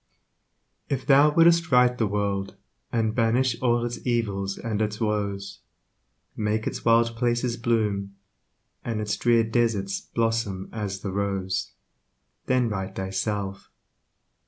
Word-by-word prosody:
If 135 -2 -2
thou 145 +1 +6
would'st 170 -1 +5
right 125 -1 +5
the 115 -3 0
world, 100 -1 -2 0.4
And 110 -2 0
banish 120 +1 +1
all 120 -1 +2
its 120 0 -5
evils 100 -5 -1
and 110 -2 -3
its 105 0 -2
woes, 100 -3 -2 0.8
Make 110 0 -1
its - - -4
wild 115 0 +3
places 120 +1 0
bloom, 105 -4 -1 0.7
And 115 -2 -3
its 105 -1 -1
drear 120 -1 +3
deserts 110 -4 0
blossom 115 -5 -2
as 100 -3 -4
the 100 - -4
rose, 95 -1 -2 0.7
Then 130 -2 +2
right 95 -3 -4
thyself. 95 +1 -3
110 Hz, 125 wpm, -25 LUFS, 100-120 Hz, 0.8 s, thou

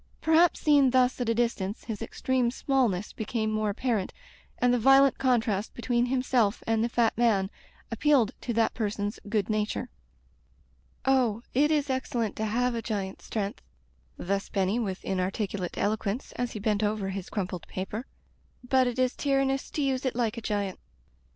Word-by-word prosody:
Perhaps, 325 +2 +4
seen 285 -3 +5
thus 255 0 +2
at 240 - 0
a 230 - +2
distance, 220 -4 -1
his 220 -2 -5
extreme 250 +2 0
smallness 240 -7 0
became 220 0 -2
more 215 -1 0
apparent, 215 -2 -1 0.5
and 245 0 +3
the 245 - +2
violent 270 +3 +5
contrast 225 -5 +1
between 240 0 0
himself 250 -4 +1
and 225 0 +1
the 235 - 0
fat 235 -1 +2
man 210 -5 +2 0.4
appealed 250 -1 +3
to 245 - -3
that 225 -1 +2
person's 205 -2 -2
good 210 -3 0
nature. 215 -1 -1 1.2
"Oh! 245 -4 +2
it 290 +4 +3
is 295 -3 +1
excellent 240 -4 -2
to 220 - -1
have 245 +3 +1
a 230 - -2
giant's 200 -4 -4
strength" 205 -2 -3 0.4
— - - -35
^thus 195 +2 -2
Benny 195 +3 +1
with 195 -5 -4
inarticulate 190 0 -2
elo 215 +2 +1
quence, 215 +4 -4
as 245 -1 -2
he 215 - -5
bent 210 0 0
over 210 -2 0
his 190 -1 -5
crumpled 185 -4 -4
paper 205 +6 -5 0.3
— - - -37
"but 260 0 +4
it 245 0 -3
is 255 0 +1
tyrannous 270 -1 0
to 295 - -2
use 265 -1 0
it 260 -3 -1
like 235 -3 0
a 230 - -6
giant." 205 -3 -2
230 Hz, 175 wpm, -28 LUFS, 205-255 Hz, 1.2 s, seen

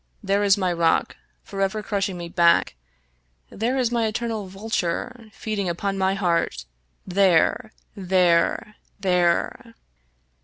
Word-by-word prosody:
There 200 +1 +1
is 200 -1 +4
my 185 -3 0
rock, 170 -1 +1 0.3
forever 195 +2 -2
crushing 195 -3 -2
me 170 -1 -6
back! 170 - +3 0.8
there 235 +6 -1
is 245 -3 +1
my 230 -2 +1
eternal 220 -2 -3
vulture, 210 +3 -4
feeding 205 -3 -3
upon 195 +3 -2
my 190 0 +1
heart! 170 - -1 0.4
There! 190 +2 +2 0.2
there 180 -3 +2
I 210 - -20 0.3
there 180 -2 0
195 Hz, 120 wpm, -23 LUFS, 175-215 Hz, 0.8 s, is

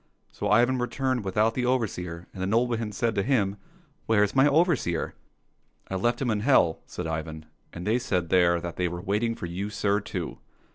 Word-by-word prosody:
" - - -41
So 105 - -3
Ivan 120 +4 +4
returned 125 0 -1
without 105 +4 +1
the 125 0 -1
overseer, 90 -9 -2
and 95 - -7
the 95 - 0
nobleman 115 0 +1
said 115 +3 0
to - - +1
him, 105 -5 +1 0.2
*' 150 -4 -37
Where's 105 -1 +3
my 135 +2 +6
overseer? 145 - +1 0.2
" - - -45
— - - -44
" - - -42
I - - -1
left 120 +5 +1
him 120 - +1
in 105 - 0
hell," 110 - +3
said 90 - -6
Ivan, 80 -1 -4
" - - -40
and 90 +1 -7
they 115 +4 +2
said 90 -8 -1
there 85 -2 +4
that 85 0 -6
they 90 - +1
were 85 0 -5
waiting 105 +5 0
for - - -6
you, 90 +4 -4
sir, 100 0 +1
too." 90 -4 -5
105 Hz, 225 wpm, -27 LUFS, 90-120 Hz, 0.2 s, my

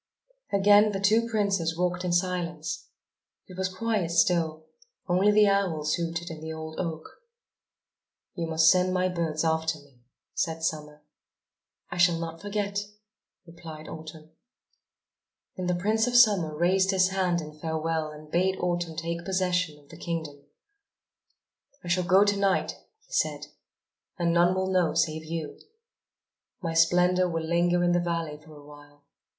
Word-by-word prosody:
Again 205 +1 +5
the 195 - -2
two 220 +4 +2
princes 195 -7 0
walked 180 0 -1
in 180 - -1
silence. 175 -3 -2 0.6
It 185 - -12
was 190 0 -1
quite 205 -2 -1
still, 165 -2 +1 0.4
only 185 +3 +3
the 210 0 +5
owls 175 -7 +1
hooted 170 0 -3
in 155 -1 -8
the 160 0 -6
old 160 0 -7
oak. 160 -3 -4 1.3
"You 170 -2 -3
must 160 0 +5
send 185 0 +2
my 185 0 +1
birds 165 -3 -2
after 160 0 0
me," 145 -4 -20 0.3
said 160 -2 -2
Summer. 150 -1 -4 0.9
"I 175 - -5
shall 175 -1 +4
not 165 0 -6
forget," 205 0 -2 0.7
replied 165 -2 -11
Autumn. 155 0 -10 1.2
Then 185 -1 -4
the 180 - +1
Prince 215 +6 +1
of 245 - -1
Summer 200 -10 +4
raised 190 +3 +2
his 190 -1 +3
hand 185 -2 0
in 155 -2 -8
farewell 160 0 -2
and 150 0 -12
bade 190 +2 +1
Autumn 175 -2 -2
take 170 +1 -4
possession 180 -3 0
of 145 -1 -22
the 160 - -12
kingdom. 160 -4 -5 1.4
"I 175 - -7
shall 180 +1 +1
go 190 +2 +5
to 205 0 +1
night," 195 -1 +1 0.3
he - - -16
said. - - 0 0.7
"And 170 -2 +1
none 175 +2 +4
will 190 0 -1
know 180 -4 +1
save 160 -1 0
you. 160 -1 -5 1.0
My 165 -4 -3
splendour 180 +2 +3
will 165 -1 -3
linger 175 +1 +2
in 175 - +3
the 175 - +3
valley 165 -3 -3
for 155 0 -15
a 145 - -15
while. 145 0 -16
170 Hz, 155 wpm, -27 LUFS, 160-185 Hz, 1.4 s, Again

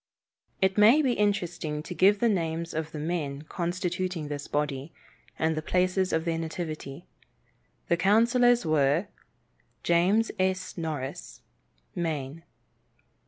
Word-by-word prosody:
It 190 +2 +2
may 235 +9 +7
be 255 -3 +2
interesting 175 -8 -1
to 180 - -6
give 195 +3 +4
the 235 - +2
names 170 -5 -1
of 160 0 -3
the 155 - -7
men 150 -3 -3
constituting 180 -1 -3
this 145 -1 -5
body, 145 0 -2 0.5
and 160 0 +1
the 155 - -2
places 185 +2 +1
of 160 +1 0
their 165 -1 -1
nativity. 160 -2 -5 0.8
The 170 - +2
councillors 235 +5 +4
were: 155 +4 +2 0.7
James 185 +7 +3
S. 185 0 -1
Norris, 155 -6 -5 0.5
Maine. 155 -3 -3
170 Hz, 120 wpm, -27 LUFS, 155-190 Hz, 0.8 s, may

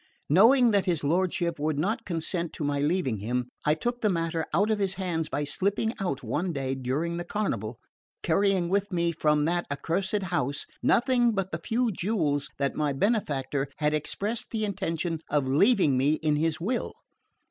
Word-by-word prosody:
Knowing 230 - +6
that 200 -2 +2
his 170 -5 0
lordship 170 +1 0
would 150 0 0
not 200 +9 -1
consent 170 0 -2
to - - -6
my 145 0 0
leaving 145 - 0
him, 125 +4 -1 0.2
I 150 - +4
took 240 +9 -3
the 215 - +3
matter 165 -2 -1
out 210 +2 +2
of 215 - +1
his 190 -1 0
hands 170 -4 -2
by 145 - -1
slipping 200 +9 0
out 145 -9 -2
one 175 +4 -1
day 135 -3 -2
during 135 +6 -2
the 175 - -3
carnival, 120 - -3 0.4
carrying 190 +1 +2
with 200 +3 0
me 170 -1 +1
from 150 -2 +2
that 175 +1 0
accursed 190 +8 -1
house 145 -6 -1 0.2
nothing 240 -1 +3
but 195 -2 -2
the 160 - -3
few 235 0 +1
jewels 170 -8 -1
that 140 -1 0
my 150 -2 0
benefactor 145 - 0
had 150 0 +1
expressed 205 +9 -2
the 215 -2 -1
intention 165 -4 -2
of 145 -2 +1
leaving 150 - +4
me 140 +3 +3
in 155 -1 0
his 155 +1 0
will. 225 +9 -2
170 Hz, 180 wpm, -27 LUFS, 145-200 Hz, 0.4 s, Knowing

